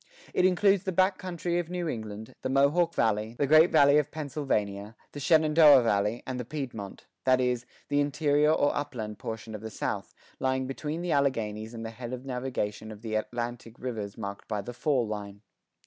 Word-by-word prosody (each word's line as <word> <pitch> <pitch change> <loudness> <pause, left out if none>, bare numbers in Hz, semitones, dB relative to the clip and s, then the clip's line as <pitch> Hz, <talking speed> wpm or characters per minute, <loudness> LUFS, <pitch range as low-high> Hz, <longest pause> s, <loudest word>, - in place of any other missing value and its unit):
It 180 - +3
includes 195 +1 +4
the 190 - 0
back 185 +2 +2
country 175 -1 -2
of 170 -1 -4
New 180 -1 -3
England, 110 -2 -6
the 130 - -2
Mohawk 145 +6 +3
Valley, 110 +1 0
the 145 - +2
Great 155 +4 +6
Valley 140 +1 +6
of 150 -1 -1
Pennsylvania, 115 -9 -3 0.2
the 145 - -7
Shenandoah 155 -3 +6
Valley, 105 +1 +1
and 130 -1 -4
the - - -2
Piedmont 120 -7 -6 0.2
that 130 -1 +4
is, 125 -1 0 0.2
the 145 0 +1
interior 145 +1 +2
or 145 -2 +2
upland 120 -8 -4
portion 110 0 -6
of 105 - -6
the 110 - -6
South, - - -4 0.2
lying 130 0 0
between 150 +5 -4
the 175 - -1
Alleghanies 115 -6 0
and 115 0 -6
the 115 - -5
head 120 +1 -7
of 130 +1 -6
navigation 125 -5 -3
of 105 +1 -11
the 110 -1 -4
Atlantic 120 +1 -3
rivers 110 -5 -5
marked 100 -2 -6
by 105 -2 -2
the 120 - -7
"fall 125 0 +1
line." 105 -1 -6
130 Hz, 190 wpm, -28 LUFS, 110-150 Hz, 0.2 s, Great